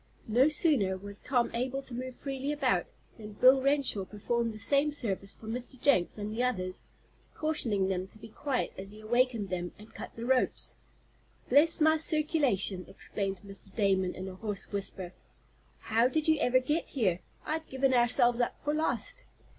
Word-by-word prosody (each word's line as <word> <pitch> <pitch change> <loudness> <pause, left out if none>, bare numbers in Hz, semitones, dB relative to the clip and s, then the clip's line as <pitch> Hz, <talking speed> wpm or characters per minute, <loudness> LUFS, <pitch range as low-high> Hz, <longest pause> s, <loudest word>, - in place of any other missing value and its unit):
No 245 +5 +4
sooner 275 - +2
was 200 +1 -8
Tom 245 -3 0
able 260 +3 -2
to 260 - -11
move 255 +1 -5
freely 275 0 -4
about 260 - +1 0.3
than 210 -1 -9
Bill 260 +5 +6
Renshaw 275 -7 +1
performed 230 +4 -2
the 215 - -9
same 280 +7 +2
service 200 -8 -3
for - - -14
Mr. 245 +3 -5
Jenks 235 -11 +3
and 210 0 -4
the 230 - -1
others, 185 -7 -1 0.5
cautioning 235 -11 0
them 185 -1 -2
to 210 - -11
be 220 +1 -11
quiet 265 +4 -2
as 195 +1 -7
he 210 +1 -13
awakened 235 -2 +1
them, 175 -1 -3
and 210 +2 -15
cut - - -9
the 230 - -6
ropes. 255 0 +1 0.7
"Bless 300 +7 +5
my 315 0 +5
circulation!" 295 - +1
exclaimed 195 -3 -3
Mr. 195 0 -13
Damon, 190 -4 +1
in 185 +1 -6
a 190 - -6
hoarse 200 0 -5
whisper. 195 -3 -4 0.7
"How 225 +2 +3
did 310 +4 0
you 315 -1 +4
ever 255 -3 +3
get 295 +6 0
here. 190 -10 +1 0.3
I'd 315 +1 -3
given 265 0 +1
ourselves 240 0 +4
up 240 - -1
for 295 - 0
lost." 320 +10 -2
240 Hz, 175 wpm, -30 LUFS, 200-275 Hz, 0.7 s, Bill